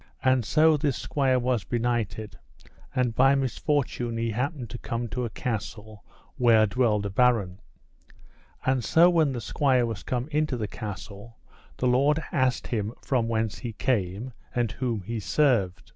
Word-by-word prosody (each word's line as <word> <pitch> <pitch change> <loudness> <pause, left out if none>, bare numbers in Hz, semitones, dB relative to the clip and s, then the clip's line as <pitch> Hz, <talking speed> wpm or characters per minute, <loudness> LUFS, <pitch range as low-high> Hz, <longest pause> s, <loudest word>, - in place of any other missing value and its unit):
And 130 -2 +3
so 155 +5 +4
this 145 -3 0
squire 135 -3 +1
was 125 -3 0
benighted, 115 -1 -2 0.6
and 125 -2 +1
by 135 +3 +4
misfortune 130 -3 -1
he 115 0 -1
happened 125 - -3
to 120 - -6
come 120 +1 -3
to 125 +3 -2
a - - -3
castle 110 -1 -5 0.3
where 115 -3 +5
dwelled 110 -2 +1
a 100 - -3
baron. 105 -5 +2 1.1
And 130 -2 +1
so 170 +10 +5
when 160 -5 +3
the 120 - -3
squire 130 -3 +2
was 115 -3 -4
come 125 +1 -3
into 150 -3 0
the 110 -2 -3
castle, 105 +1 -8 0.4
the - - -2
lord 140 +5 +3
asked 130 -2 +1
him 110 -2 -2
from 125 -4 0
whence 110 -2 -1
he 120 -3 -5
came, 105 +1 -1 0.2
and 120 -3 0
whom 120 -5 -2
he 115 +4 -4
served. 100 - +1
120 Hz, 160 wpm, -26 LUFS, 110-130 Hz, 1.1 s, where